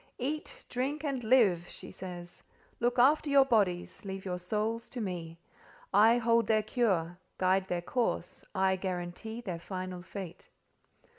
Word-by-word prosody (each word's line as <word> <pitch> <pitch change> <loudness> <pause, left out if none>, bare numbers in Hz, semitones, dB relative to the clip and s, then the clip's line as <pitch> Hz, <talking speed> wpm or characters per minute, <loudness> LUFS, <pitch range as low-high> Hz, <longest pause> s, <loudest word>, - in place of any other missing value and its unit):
"Eat, 295 +5 -4
drink, 275 +5 -2
and 275 -5 -2
live!" 215 -8 +4
she - - -9
says. 175 -2 -8 0.4
"Look 240 +1 +1
after 290 +4 +5
your 280 -1 +6
bodies; 200 -8 +1
leave 195 -1 -6
your 180 -1 -2
souls 215 +5 -2
to 250 - -6
me. 175 -6 -4 0.6
I 220 +4 +6
hold 230 -1 +3
their 215 -1 +3
cure—guide 185 -3 0
their 175 -2 -2
course: 230 -5 -1
I 190 0 +3
guarantee 185 +5 -4
their 180 -7 -4
final 185 0 -5
fate." 185 -1 -8
200 Hz, 140 wpm, -31 LUFS, 180-240 Hz, 0.6 s, your